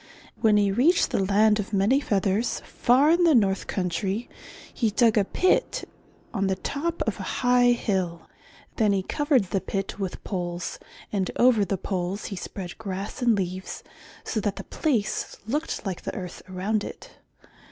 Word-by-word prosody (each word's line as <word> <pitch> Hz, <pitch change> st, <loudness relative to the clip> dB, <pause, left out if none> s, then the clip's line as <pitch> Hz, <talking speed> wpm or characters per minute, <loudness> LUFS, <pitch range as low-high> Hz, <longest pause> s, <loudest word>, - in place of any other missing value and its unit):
When 215 Hz, -2 st, +4 dB
he 200 Hz, -1 st, +3 dB
reached 280 Hz, -, +3 dB
the 195 Hz, -, +1 dB
Land 210 Hz, +2 st, +4 dB
of 210 Hz, +1 st, -4 dB
Many 205 Hz, +8 st, +3 dB
Feathers 205 Hz, -2 st, 0 dB
far 265 Hz, +6 st, +3 dB
in 345 Hz, +1 st, +4 dB
the 325 Hz, -4 st, +5 dB
north 200 Hz, -4 st, +2 dB
country, 195 Hz, +4 st, -2 dB, 0.5 s
he 230 Hz, -, +1 dB
dug 225 Hz, +1 st, +3 dB
a 210 Hz, -, +4 dB
pit 370 Hz, -, +1 dB, 0.5 s
on 195 Hz, -3 st, 0 dB
the 190 Hz, -, +1 dB
top 320 Hz, -, -2 dB
of -, -, -3 dB
a -, -, -4 dB
high 245 Hz, -1 st, +5 dB
hill. 185 Hz, -7 st, -2 dB, 0.5 s
Then 215 Hz, -3 st, +3 dB
he 190 Hz, -1 st, 0 dB
covered 270 Hz, -, +1 dB
the 195 Hz, -, +1 dB
pit 195 Hz, +1 st, -4 dB
with 190 Hz, -2 st, -4 dB
poles 175 Hz, -2 st, -4 dB, 0.3 s
and 190 Hz, -3 st, 0 dB
over 240 Hz, -4 st, +5 dB
the 195 Hz, 0 st, -1 dB
poles 185 Hz, +1 st, -3 dB
he -, -, -3 dB
spread 180 Hz, 0 st, -7 dB
grass 200 Hz, +4 st, -5 dB
and 240 Hz, -2 st, +4 dB
leaves 185 Hz, -1 st, -4 dB, 0.4 s
so 220 Hz, -, -2 dB
that 205 Hz, -1 st, -1 dB
the -, -, -7 dB
place 245 Hz, -10 st, -1 dB
looked 295 Hz, +2 st, -2 dB
like 190 Hz, -3 st, -3 dB
the -, -, -5 dB
earth 180 Hz, -2 st, -6 dB
around 200 Hz, +3 st, -1 dB
it. -, -, -10 dB
205 Hz, 170 wpm, -26 LUFS, 190-245 Hz, 0.5 s, the